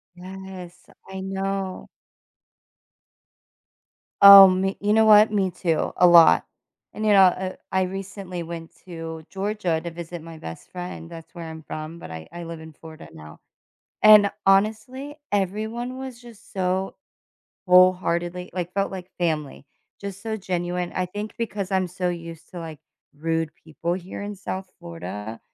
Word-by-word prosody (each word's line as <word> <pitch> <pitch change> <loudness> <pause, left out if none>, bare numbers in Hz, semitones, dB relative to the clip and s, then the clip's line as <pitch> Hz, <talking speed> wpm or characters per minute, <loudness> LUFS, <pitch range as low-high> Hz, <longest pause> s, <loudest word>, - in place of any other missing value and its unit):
Yes, 185 -1 -10 0.2
I 190 0 -6
know. 195 0 -4 2.3
Oh, 200 -1 +12
me 190 +1 0
you 205 +1 +1
know 220 +1 +5
what? 215 0 +7
Me 195 -3 +1
too, 165 -3 -1
a 180 - +5
lot. 170 -2 +7 0.5
And, 215 - -4
you 210 - +4
know, 195 - +7
uh, 185 0 +1 0.2
I 190 0 +2
recently 190 -1 -6
went 165 0 -8
to 165 -2 -7
Georgia 195 -4 -1
to 170 0 -6
visit 170 0 -8
my 165 0 -10
best 80 - -9
friend, 180 -2 -7
that's 165 -1 -11
where 170 -1 -8
I'm 160 0 -9
from, 155 +2 -7
but 80 - -10
I 80 -1 -8
I 175 0 -7
live 165 -1 -7
in 160 0 -11
Florida 160 +1 -12
now, 75 0 -12 0.6
and 210 -1 +8
honestly, 220 +8 +1 0.2
everyone 220 +6 -2
was 260 -2 -7
just 235 -3 -15
so 190 0 -1 0.7
wholeheartedly, 180 -1 +3
like, 180 -1 -4
felt 195 0 0
like 185 -1 -8
family, 155 -6 -2 0.4
just 200 -1 -7
so 220 -1 -3
genuine, 180 -2 -3
I 185 -1 -1
think 205 +3 -6
because 205 -4 -3
I'm 190 -1 +1
so 180 +1 -3
used 170 -2 -7
to, 180 - -8
like, 160 -3 -8 0.4
rude 165 +1 -1
people 170 +2 -3
here 185 0 -7
in 205 0 -5
South 190 -1 -6
Florida, 115 -11 -7
185 Hz, 155 wpm, -24 LUFS, 170-195 Hz, 2.3 s, Oh